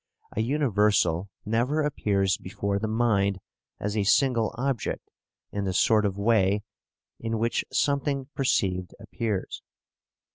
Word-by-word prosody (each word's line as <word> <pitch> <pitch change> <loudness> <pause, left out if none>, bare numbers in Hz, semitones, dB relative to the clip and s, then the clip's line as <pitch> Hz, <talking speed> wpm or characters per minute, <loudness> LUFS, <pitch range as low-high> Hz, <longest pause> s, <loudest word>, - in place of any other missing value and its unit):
A 110 - -1
universal 105 - +2 0.2
never 120 +8 +1
appears 100 -9 +1
before 100 +1 -3
the 110 - -2
mind 105 -4 +2 0.4
as 105 +1 -2
a 105 - +1
single 115 +1 +3
object 135 -1 -2 0.4
in 100 -1 -2
the 95 - -1
sort 105 0 +4
of 100 -1 -4
way 105 -1 +2 0.6
in 115 0 -2
which 115 +2 0
something 140 -1 0
perceived 90 -9 0
appears. 110 -5 -3
110 Hz, 120 wpm, -27 LUFS, 100-120 Hz, 0.6 s, sort